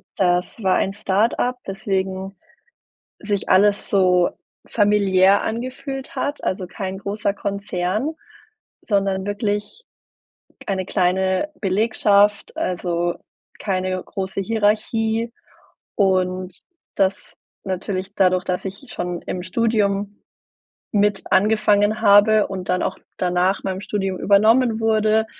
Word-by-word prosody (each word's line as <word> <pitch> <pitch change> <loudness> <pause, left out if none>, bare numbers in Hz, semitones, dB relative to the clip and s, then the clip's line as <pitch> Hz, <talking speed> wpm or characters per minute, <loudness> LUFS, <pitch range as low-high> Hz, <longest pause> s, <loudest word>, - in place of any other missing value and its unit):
das 180 +4 0
war 190 -1 +2
ein 195 - 0
Start-Up, 220 +5 0
weswegen 190 -1 -3 0.8
sich 205 -2 -2
alles 200 +2 +3
so 180 -3 +3 0.4
familiär 200 -2 +3
angefühlt 255 +3 -5
hat, 285 +1 -2
also, 185 -1 -2
kein 190 0 -5
großer 200 +1 -2
Konzern, 200 - -2 0.7
sondern 195 -2 0
wirklich 205 - -3 0.8
eine 190 -2 -1
kleine 190 +7 0
Belegschaft, 205 0 +2
also, 175 -1 -1 0.4
keine 185 -2 -2
große 190 0 -4
Hierarchie. 225 +2 0 0.6
Und 185 -2 0 0.4
das 195 0 -1 0.3
natürlich 190 +1 -4
dadurch, 185 -1 +3
dass 180 +1 -2
ich 195 +7 -7
schon 175 -1 -4
im 180 -1 -4
Studium 205 -1 0 0.7
mit 205 -1 +2
angefangen 210 +1 +3
habe 205 +1 +6
und 185 -2 -6
dann 180 0 +1
auch - - -2 0.2
danach 180 +2 +1
meinem 190 0 -3
Studium 195 -3 -2
übernommen 220 +3 +3
wurde, 220 0 +2
200 Hz, 105 wpm, -21 LUFS, 185-210 Hz, 0.8 s, habe